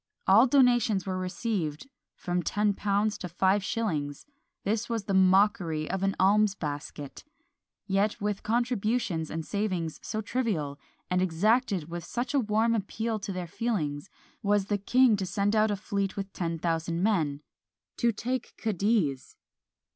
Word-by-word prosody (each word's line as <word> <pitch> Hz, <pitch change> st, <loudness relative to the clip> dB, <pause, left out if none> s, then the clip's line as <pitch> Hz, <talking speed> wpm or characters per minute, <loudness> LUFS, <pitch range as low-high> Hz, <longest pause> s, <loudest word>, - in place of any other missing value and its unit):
All 220 Hz, +7 st, +6 dB
donations 240 Hz, -7 st, +3 dB
were 185 Hz, -1 st, -2 dB
received, 185 Hz, -, -3 dB, 0.3 s
from 180 Hz, -1 st, -2 dB
ten 205 Hz, +3 st, +1 dB
pounds 205 Hz, +1 st, 0 dB
to 180 Hz, -, -5 dB
five 190 Hz, +3 st, +2 dB
shillings: 155 Hz, -11 st, -2 dB, 0.4 s
this 220 Hz, +3 st, -1 dB
was 230 Hz, -3 st, -1 dB
the 195 Hz, -, -3 dB
mockery 185 Hz, -4 st, +3 dB
of 190 Hz, 0 st, -2 dB
an 195 Hz, 0 st, +1 dB
alms 205 Hz, +1 st, +4 dB
basket! 145 Hz, -3 st, -6 dB, 0.6 s
Yet 200 Hz, +2 st, +1 dB
with 205 Hz, -1 st, -2 dB
contributions 225 Hz, -7 st, 0 dB
and 160 Hz, 0 st, -4 dB
savings 185 Hz, -6 st, -2 dB
so 215 Hz, -, -4 dB
trivial, 195 Hz, -, -2 dB, 0.3 s
and 180 Hz, 0 st, +2 dB
exacted 190 Hz, -, +1 dB
with 170 Hz, 0 st, -6 dB
such 245 Hz, -, -3 dB
a 280 Hz, -, +4 dB
warm 220 Hz, 0 st, +2 dB
appeal 220 Hz, +1 st, -2 dB
to 200 Hz, -, -5 dB
their 180 Hz, -1 st, -4 dB
feelings, 170 Hz, -5 st, -2 dB, 0.3 s
was 205 Hz, -1 st, +2 dB
the 205 Hz, 0 st, -1 dB
king 245 Hz, +2 st, +4 dB
to 195 Hz, -, -2 dB
send 200 Hz, +3 st, 0 dB
out 215 Hz, 0 st, +4 dB
a 205 Hz, -, 0 dB
fleet 200 Hz, -1 st, -3 dB
with 195 Hz, 0 st, -5 dB
ten 165 Hz, -2 st, -2 dB
thousand 165 Hz, +1 st, -1 dB
men 155 Hz, -9 st, +1 dB, 0.6 s
to 235 Hz, -1 st, +3 dB
take 245 Hz, +3 st, -4 dB
Cadiz! 200 Hz, -, 0 dB
200 Hz, 150 wpm, -28 LUFS, 175-220 Hz, 0.6 s, All